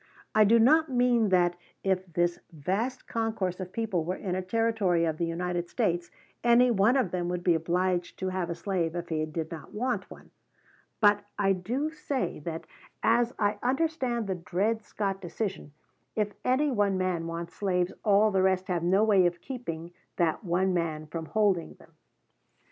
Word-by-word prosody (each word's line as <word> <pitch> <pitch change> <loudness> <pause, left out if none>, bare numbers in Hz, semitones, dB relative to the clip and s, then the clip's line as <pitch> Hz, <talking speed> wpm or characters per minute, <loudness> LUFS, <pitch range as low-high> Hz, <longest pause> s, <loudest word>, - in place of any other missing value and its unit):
I 215 0 +6
do 230 +3 +6
not 310 +7 +5
mean 245 -4 +3
that, 175 -2 +3 0.3
if 185 -2 0
this 175 +1 +1
vast 195 - -2
concourse 220 -6 -2
of 185 -1 -6
people 215 -7 -1
were 180 +3 -2
in 190 -2 -4
a 185 - -1
Territory 195 -4 +1
of 160 -1 -1
the 170 - 0
United 175 +1 -2
States, 175 0 0 0.3
any 240 +1 +5
one 225 +4 +4
of 230 -10 +1
them 175 -1 -2
would 180 0 -3
be 175 - +4
obliged 175 +2 0
to 190 - -2
have 185 -2 -2
a 170 - -2
slave 175 -3 -2
if 175 0 -4
he 155 -1 0
did 160 +1 -4
not 165 +3 -9
want 250 +3 -1
one; - - -14 0.7
but 205 -1 +4
I 195 -1 +3
do 245 +12 -2
say 290 - -3
that, 160 +1 -5 0.4
as 235 +2 +3
I 205 0 0
understand 260 -3 0
the 195 - -1
Dred 190 +6 -1
Scott 195 -2 -3
decision, 190 -3 -4 0.4
if 210 -1 0
any 275 +3 +2
one 205 -5 +1
man 180 -3 -1
wants 170 0 -5
slaves 180 -3 0
all 210 +1 +4
the 190 -1 +2
rest 190 0 +1
have 175 -2 0
no 190 +5 +3
way 200 -5 +5
of 175 0 -4
keeping 175 -11 -6 0.2
that 170 +4 0
one 185 +1 +1
man 160 -3 -1
from 160 +1 -6
holding 200 -6 +1
them. - - -20
190 Hz, 180 wpm, -28 LUFS, 175-225 Hz, 0.7 s, I